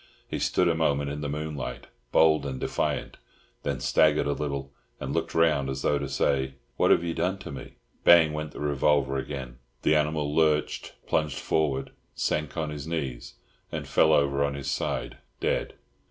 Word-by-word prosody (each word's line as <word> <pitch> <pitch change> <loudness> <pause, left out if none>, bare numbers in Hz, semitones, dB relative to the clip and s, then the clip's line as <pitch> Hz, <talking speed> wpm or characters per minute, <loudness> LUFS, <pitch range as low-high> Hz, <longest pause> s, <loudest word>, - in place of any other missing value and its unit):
He - - -3
stood 90 - +2
a 85 - +3
moment 70 -3 +1
in 75 +1 -5
the 70 - -3
moonlight, 70 -4 -4 0.3
bold 80 -2 +5
and 65 -2 -4
defiant, - - -2 0.4
then 70 -3 -2
staggered 70 +3 +3
a 70 - +1
little 70 -2 -3 0.3
and 65 +2 -4
looked - - -2
round 75 -5 +3
as 65 0 -4
though 75 - +2
to 70 -1 -4
say, 65 -1 0 0.2
"What - - +3
have - - +5
you 85 -1 -2
done 95 +3 0
to 95 - -8
me?" 70 - -8 0.3
Bang 85 -3 +7
went 75 0 -3
the - - -9
revolver 70 -1 +2
again; 65 -2 -5 0.2
the - - +4
animal 75 -1 0
lurched, 75 -2 +1
plunged 75 -2 0
forward, 70 -4 0 0.2
sank 75 +1 -1
on 80 -2 -1
his 75 0 -6
knees, 70 -7 -4 0.4
and - - -4
fell 80 - +4
over 70 -2 +3
on 70 0 -1
his 70 -1 -3
side, - - -2 0.2
dead. - - -1
70 Hz, 180 wpm, -27 LUFS, 70-75 Hz, 0.4 s, Bang